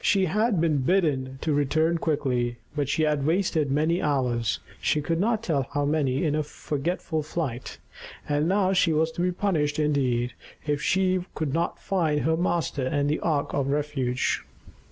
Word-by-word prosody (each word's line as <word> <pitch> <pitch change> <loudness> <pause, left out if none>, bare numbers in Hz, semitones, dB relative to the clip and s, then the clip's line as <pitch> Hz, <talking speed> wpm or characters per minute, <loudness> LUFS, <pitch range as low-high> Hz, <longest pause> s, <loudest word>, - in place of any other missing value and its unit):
She 195 -2 +3
had 210 +3 +1
been 160 -3 +2
bidden 135 -4 +1
to 155 - 0
return 155 +4 +2
quickly; 125 -7 0 0.2
but 145 -2 -1
she 155 - +1
had 150 -2 +1
wasted 160 -2 +1
many 155 +5 +1
hours 125 -6 0 0.2
she 150 - +2
could 165 +3 -1
not 220 +2 +1
tell 140 - 0
how 145 0 +1
many 140 -2 +1
in 150 - +1
her 155 - +1
forgetful 155 +2 -3
flight. 150 -5 -4 0.5
And 145 +1 +1
now 195 -1 +2
she 180 -3 +3
was 160 +1 +2
to 175 - -4
be 180 +1 +2
punished 160 -6 0
indeed, 130 -6 +1 0.3
if 150 -1 0
she 185 +1 +2
could 150 -3 -2
not 170 +2 0
find 160 -6 0
her 160 0 +2
master 165 -6 0
and 145 +1 +1
the 155 - 0
ark 150 -4 -1
of 140 -2 0
refuge. 140 -3 -1
150 Hz, 175 wpm, -26 LUFS, 140-170 Hz, 0.5 s, She